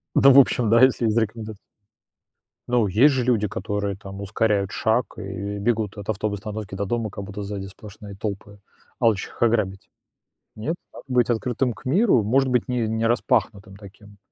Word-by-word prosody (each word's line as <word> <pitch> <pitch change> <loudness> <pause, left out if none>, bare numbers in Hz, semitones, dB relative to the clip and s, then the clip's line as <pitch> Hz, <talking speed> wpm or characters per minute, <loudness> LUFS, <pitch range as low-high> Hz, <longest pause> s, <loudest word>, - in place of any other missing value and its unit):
Да 135 - +7
в 135 - +8
общем, 125 -4 +3
да, 115 +2 +5
если 130 -2 +4
есть 110 0 +1
рекоменда 110 -1 -2 1.1
Но 120 -4 +2
есть 125 +10 +4
же 130 -2 0
люди, 115 -4 +1
которые 100 0 -3
там 100 0 -9
ускоряют 100 -1 0
шаг 115 +2 0
и 100 0 -5
бегут 110 -1 -1
от 100 0 -8
автоб 105 0 -1
остановки 105 -1 -6
до 100 +1 -2
дома, 110 0 -2
как 100 - -7
будто 100 +1 -7
сзади 100 -1 -5
сплошные 100 +1 -11
толпы, 100 0 -6 0.4
алчущих 115 -5 +1
их - - -1
ограбить. 105 -5 0 0.7
Нет? 145 +11 -3 0.2
А - - -10
быть 125 -3 +2
открытым 120 +1 0
к - - -17
миру, 175 - +3
может 130 +5 +2
быть, 125 -2 +1
ни 125 -1 -1
не 110 +1 -1
распахнутым 100 -4 0
таким, 100 0 -15
110 Hz, 175 wpm, -23 LUFS, 100-120 Hz, 1.1 s, в